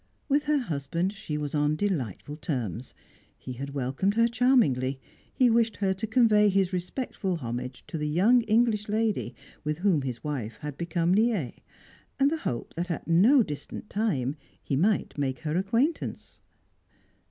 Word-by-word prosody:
With 290 Hz, +1 st, +2 dB
her 300 Hz, 0 st, +2 dB
husband 170 Hz, -, -2 dB
she 195 Hz, -8 st, -5 dB
was 145 Hz, -2 st, -4 dB
on 150 Hz, 0 st, +2 dB
delightful 150 Hz, -, -2 dB
terms; 125 Hz, -, -4 dB, 0.4 s
he 130 Hz, -, -7 dB
had 140 Hz, +3 st, -6 dB
welcomed 140 Hz, +10 st, 0 dB
her 230 Hz, +1 st, +4 dB
charmingly; 220 Hz, -, +2 dB, 0.3 s
he 255 Hz, -, +3 dB
wished 230 Hz, -1 st, +2 dB
her 195 Hz, -2 st, +1 dB
to 190 Hz, +4 st, -4 dB
convey 215 Hz, -3 st, +4 dB
his 195 Hz, -1 st, +1 dB
respectful 185 Hz, +1 st, -3 dB
homage 125 Hz, -2 st, -5 dB
to 160 Hz, -, -5 dB
the 150 Hz, -, -1 dB
young 200 Hz, +11 st, +4 dB
English 215 Hz, -1 st, +2 dB
lady 215 Hz, -, 0 dB, 0.3 s
with 150 Hz, 0 st, -2 dB
whom 180 Hz, -4 st, +2 dB
his 125 Hz, -3 st, -5 dB
wife 120 Hz, -7 st, -4 dB
had 150 Hz, -2 st, -5 dB
become 170 Hz, +2 st, 0 dB
liee, 210 Hz, -, +1 dB, 0.6 s
and 275 Hz, +1 st, +4 dB
the 325 Hz, -, 0 dB
hope 120 Hz, -, -4 dB
that 175 Hz, +3 st, -3 dB
at 170 Hz, -, -4 dB
no 215 Hz, +11 st, +6 dB
distant 150 Hz, +5 st, -7 dB
time 150 Hz, -, 0 dB, 0.3 s
he 140 Hz, -, -1 dB
might 190 Hz, 0 st, +1 dB
make 135 Hz, -2 st, -1 dB
her 155 Hz, -1 st, -2 dB
acquaintance. 230 Hz, -, -1 dB
175 Hz, 160 wpm, -27 LUFS, 140-220 Hz, 0.6 s, no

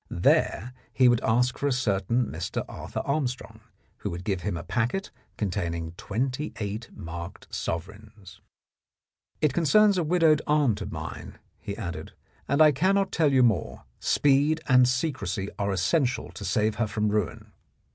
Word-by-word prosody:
There 125 Hz, +5 st, +1 dB, 0.2 s
he 125 Hz, +2 st, +4 dB
would 120 Hz, -1 st, +4 dB
ask 125 Hz, +3 st, +1 dB
for 145 Hz, -, 0 dB
a -, -, +1 dB
certain 115 Hz, -1 st, +1 dB
Mr. -, -, -4 dB
Arthur -, -, -5 dB
Armstrong, 140 Hz, -3 st, -2 dB, 0.4 s
who -, -, -4 dB
would 85 Hz, +1 st, -6 dB
give 95 Hz, -2 st, -1 dB
him 100 Hz, -3 st, -2 dB
a 85 Hz, -, -6 dB
packet 120 Hz, -, -1 dB, 0.3 s
containing 85 Hz, -5 st, -2 dB
twenty 125 Hz, -, -3 dB
eight 105 Hz, +2 st, -4 dB
marked 85 Hz, +1 st, -8 dB
sovereigns. 100 Hz, +3 st, -6 dB, 0.5 s
" -, -, -50 dB
It 150 Hz, -4 st, +3 dB
concerns 195 Hz, +6 st, +4 dB
a -, -, +1 dB
widowed 160 Hz, -2 st, +3 dB
aunt 145 Hz, -8 st, +2 dB
of -, -, -5 dB
mine," -, -, -7 dB, 0.2 s
he -, -, -6 dB
added, -, -, -6 dB, 0.3 s
"and 140 Hz, +3 st, +5 dB
I 155 Hz, -, +7 dB
cannot 190 Hz, +7 st, +2 dB
tell 155 Hz, -3 st, +2 dB
you 130 Hz, -2 st, +5 dB
more. 110 Hz, -9 st, 0 dB, 0.2 s
Speed 145 Hz, +3 st, +3 dB
and 125 Hz, -2 st, +6 dB
secrecy 125 Hz, -, -1 dB
are 100 Hz, 0 st, 0 dB
essential 120 Hz, -, 0 dB
to -, -, -9 dB
save 110 Hz, 0 st, 0 dB
her 115 Hz, -, +2 dB
from 105 Hz, 0 st, 0 dB
ruin." 105 Hz, -4 st, -2 dB
120 Hz, 155 wpm, -27 LUFS, 100-145 Hz, 0.5 s, I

